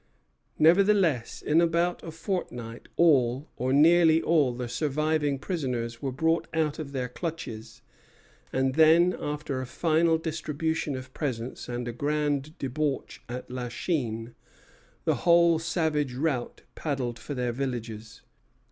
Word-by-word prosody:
Nevertheless, 170 - +3
in 160 +3 +3
about 170 +1 +1
a - - -7
fortnight 155 - -5
all, 135 -4 +3
or 130 +2 -1
nearly 160 +3 +6
all, 155 -6 +3
the 125 0 -5
surviving 150 +2 0
prisoners 125 -8 -3
were 135 -2 -2
bought 160 +5 +1
out 155 -2 0
of 145 -3 -5
their 130 -2 -2
clutches; 155 -6 -6 0.7
and 130 0 +1
then, 165 +4 +5
after 145 -2 -3
a 130 - -5
final 160 +3 +2
distribution 160 -2 -2
of 130 0 -8
presents 125 -5 -4
and 120 0 -3
a 120 - -3
grand 145 +2 -1
debauch 140 +1 -3
at 125 +1 -6
La 125 -1 -4
Chine, 120 -5 -2 0.7
the - - +2
whole 170 -1 +5
savage 155 -5 -1
rout 135 -3 -2
paddled 130 -6 -3
for 145 - -6
their 125 -1 -1
villages. 115 -4 -5
145 Hz, 130 wpm, -27 LUFS, 125-160 Hz, 0.7 s, nearly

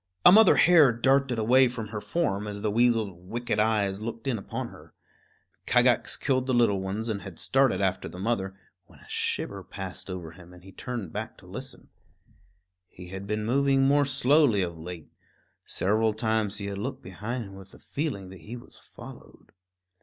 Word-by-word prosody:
A - - +11
mother 215 +1 +7
hare 160 -7 +6
darted 135 +1 +2
away 125 +4 +5
from 115 -3 -6
her 105 -2 -5
form 105 -12 -1
as 100 -1 -5
the 105 - +1
weasel's 115 -2 +2
wicked 105 +6 -4
eyes 105 -2 +1
looked 115 +2 -6
in 125 -5 -1
upon 95 - -5
her. - - -16 0.7
Kagax - - +3
killed 130 -1 0
the 130 - +1
little 105 -5 +3
ones 100 +4 -3
and 105 -3 -2
had 95 -4 -10
started 130 -8 +2
after 95 -1 -1
the - - -11
mother, 95 -2 -2 0.3
when - - -19
a - - -19
shiver - - -2
passed 95 -1 -8
over 90 -3 -6
him 90 +1 -15
and 90 - -16
he 95 - -13
turned 115 -7 -6
back - - -5
to - - -17
listen. - - -9 1.0
He 90 0 -12
had 95 +1 -7
been 105 +1 -2
moving 135 +3 +3
more 145 +1 +4
slowly 140 -5 +3
of 85 -1 -4
late; 80 -1 -9 0.6
several 110 +3 +1
times 110 -2 0
he 100 - -5
had 100 -1 -4
looked 130 +6 -5
behind 115 +7 -5
him 100 -2 -11
with 95 0 -12
the - - -16
feeling 135 - -4
that 95 -2 -12
he 110 +9 -8
was 120 - -15
followed. - - -14
110 Hz, 185 wpm, -27 LUFS, 95-125 Hz, 1.0 s, A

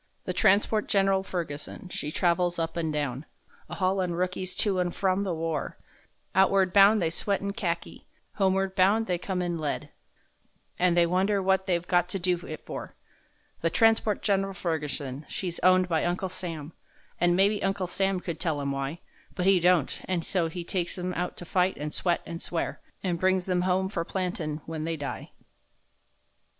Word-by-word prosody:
The - - -3
transport 210 +1 +3
Gen'ral 195 -1 +3
Ferguson, 170 -2 -5
she 150 -4 -4
travels 175 +1 +1
up 165 -1 -2
and 165 -2 -1
down, 145 -3 -2 0.5
A - - -5
haulin' 185 -2 0
rookies 180 +1 -2
to 195 -2 +1
and 175 -1 -1
from 190 0 +1
the 195 -2 -1
war; 165 -1 -3 0.6
Outward 190 -1 +4
bound 205 +2 +7
they 165 -3 0
sweat 200 +4 -1
in 200 0 -3
Kharki; 175 -6 -4 0.3
homeward 195 -1 +2
bound 200 +4 +3
they 180 -4 -1
come 185 0 -2
in 175 -1 -2
lead 150 -2 -3 0.9
And 175 -1 +3
they 170 - +6
wonder 190 +4 +2
what 190 0 +1
they've 175 -1 0
got 175 -1 +2
to 195 - -2
do 180 -1 +1
it 155 - -7
for. - - -7 0.7
The 165 - +2
transport 225 +2 +3
Gen'ral 195 -1 +1
Ferguson, 145 -6 -3
she's 175 -3 -3
owned 185 0 +5
by 165 -3 +1
Uncle 180 +2 -1
Sam, 165 -4 -6 0.5
An' 175 0 +4
maybe 200 +2 +3
Uncle 195 -1 0
Sam 190 +1 0
could 170 -3 -5
tell 155 -4 -1
'em 140 -1 -2
why, 140 +4 -3 0.3
But 180 - -1
he 195 -1 +6
don't—and 175 0 +1
so 175 -4 0
he 175 +1 -5
takes 175 0 -2
'em 180 0 -3
out 180 +1 -3
to 175 - -7
fight, 180 +2 +1
and 150 +1 -4
sweat, 175 -2 0
and 165 0 -6
swear, 170 - -3 0.2
An' 180 -3 0
brings 185 +1 +2
them 180 -1 +1
home 185 +1 +1
for 175 -4 -2
plantin' 170 -5 -3
when 160 -1 -4
they 165 0 -2
die. 145 -2 -5
180 Hz, 180 wpm, -27 LUFS, 165-190 Hz, 0.9 s, bound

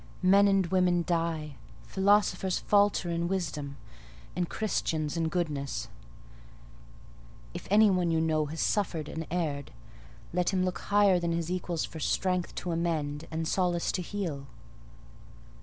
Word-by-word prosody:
Men 200 +2 +6
and 195 -1 +3
women 180 -1 +2
die; 165 -4 -2 0.3
philosophers 190 -2 +2
falter 205 -4 +2
in 170 0 -1
wisdom, 155 -7 -3 0.6
and 180 -1 -1
Christians 160 -7 -1
in 165 -1 0
goodness: 150 - -2 1.6
if - - -7
any 210 +1 +6
one 180 -2 +1
you 165 -1 +2
know 155 -2 +1
has 160 +3 -4
suffered 170 -7 0
and 160 0 -5
erred, 155 -5 -2 0.6
let 180 0 +1
him 185 -2 +1
look 185 - -2
higher 200 -3 +3
than 170 -1 -1
his 170 0 -2
equals 175 -2 -2
for 160 - -9
strength 180 +3 0
to 180 - -3
amend 160 -3 -2
and 160 0 -3
solace 175 -2 +1
to 185 - -2
heal." 170 -8 -4
170 Hz, 140 wpm, -29 LUFS, 160-185 Hz, 1.6 s, Men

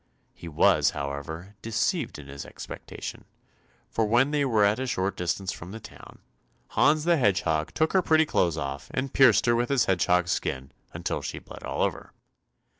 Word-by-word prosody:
He 85 - -11
was 75 - +4
however, 70 +7 -5
deceived 115 - -1
in 75 -1 -11
his 70 0 -7
expectation, - - -8 0.6
for 115 - -1
when 125 +6 +3
they 150 -1 +1
were 115 -6 +3
at 105 +4 +2
a 130 - -2
short 95 -4 -1
distance 90 +2 -2
from 90 -2 -9
the 110 +4 -7
town, - - -13 0.5
Hans 150 +1 +3
the 170 0 +3
Hedgehog 90 - +1
took 160 0 +1
her 190 - +5
pretty 160 -2 +4
clothes 85 - +1
off, 70 -2 -5
and 130 +1 -2
pierced 130 -5 +5
her 120 -1 +3
with 120 +1 0
his 135 -4 +3
hedgehog's 90 -1 +2
skin 65 -4 -2 0.2
until - - -3
she - - -5
bled - - -11
all - - -1
over. - - -3
100 Hz, 180 wpm, -27 LUFS, 85-130 Hz, 0.6 s, her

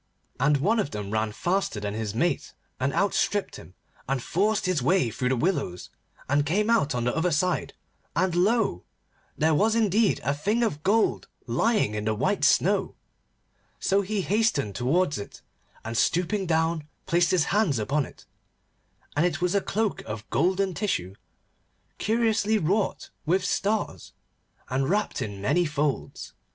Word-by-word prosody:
And 145 +3 +3
one 205 +11 +2
of 145 - 0
them 105 -3 -5
ran 110 0 0
faster 175 - -1
than 105 0 -3
his 110 -1 -4
mate, 170 +9 0 0.3
and 130 +2 0
outstripped 200 +3 0
him, 90 - -14 0.3
and 135 -1 +1
forced 205 - 0
his 180 -6 +1
way 145 -2 +2
through 125 +3 -1
the 130 - +2
willows, 120 - -2 0.4
and 145 +2 +2
came 205 +9 +1
out 150 - +2
on 120 - -1
the 125 - 0
other 165 +2 +1
side, 180 +3 0 0.4
and 185 0 +1
lo! 195 - +1 0.5
there 160 +1 +3
was 215 +8 +3
indeed 215 -1 +2
a 140 - +1
thing 210 +11 0
of 150 -10 -1
gold 210 +6 +1 0.2
lying 210 - +1
on 105 0 -3
the 110 0 +1
white - - 0
snow. - - +3 0.8
So 195 +1 +2
he 200 +1 -2
hastened 195 - +1
towards 145 - +1
it, 100 - -10 0.4
and 115 +1 -4
stooping 180 - +1
down 160 -1 0 0.2
placed 170 0 +2
his 180 -4 +3
hands 200 - +2
upon 135 +7 0
it, - - -17 0.9
and 145 - +2
it 180 - 0
was 180 +1 0
a 200 - +2
cloak 215 +1 -1
of 110 0 -6
golden 190 +1 +1
tissue, 95 - -2 0.9
curiously 220 -1 +2
wrought 200 +3 -1 0.2
with 185 +3 +2
stars, 205 +2 -1 0.5
and 135 +2 -1
wrapped 210 -7 0
in 100 -4 -5
many 170 - +1
folds. 145 -1 -3
170 Hz, 160 wpm, -26 LUFS, 130-200 Hz, 0.9 s, And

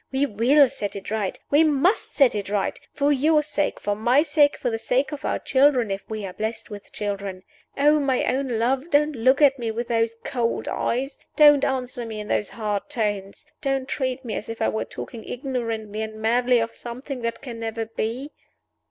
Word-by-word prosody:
We 270 +1 +2
will 265 +5 +4
set 240 -6 -5
it 200 +1 -7
right! 210 -4 -1
We 295 +3 +6
must 315 +6 +2
set 275 -4 +5
it 205 -2 -4
right 205 -1 -1
for 285 0 +1
your 300 +2 +3
sake, 295 0 -1
for 205 0 -1
my 245 +7 +3
sake, 290 -2 +3
for 245 - -2
the 225 - -2
sake 255 +4 0
of 295 -2 -6
our - - 0
children 260 -5 +3
if 195 0 -5
we 215 -2 -4
are 185 - -6
blessed 220 +1 -4
with 205 -1 -9
children. 200 -2 -4 0.3
Oh, 295 +2 +4
my 270 -3 +1
own 270 +1 0
love, 260 +7 0
don't 295 0 +3
look 260 +5 +3
at 275 -2 +5
me 230 -2 -2
with 235 +2 -4
those 230 -1 +1
cold 235 -2 -1
eyes! 270 +3 -2 0.2
Don't 295 -2 +7
answer 255 -2 -1
me 220 -2 -6
in 210 - -7
those 210 - 0
hard 210 -3 -3
tones! 205 0 -2 0.2
Don't 270 -2 -1
treat 260 -1 -2
me 225 - -4
as 210 - -5
if 225 - -6
I - - +2
were 220 - -2
talking 230 -3 -8
ignorantly 230 -5 -4
and 220 0 -5
madly 240 +3 +2
of 230 0 -1
something 250 +2 -7
that 230 +2 -3
can 240 -4 -7
never 225 0 -3
be!" 230 +6 -4
240 Hz, 205 wpm, -24 LUFS, 220-275 Hz, 0.3 s, Don't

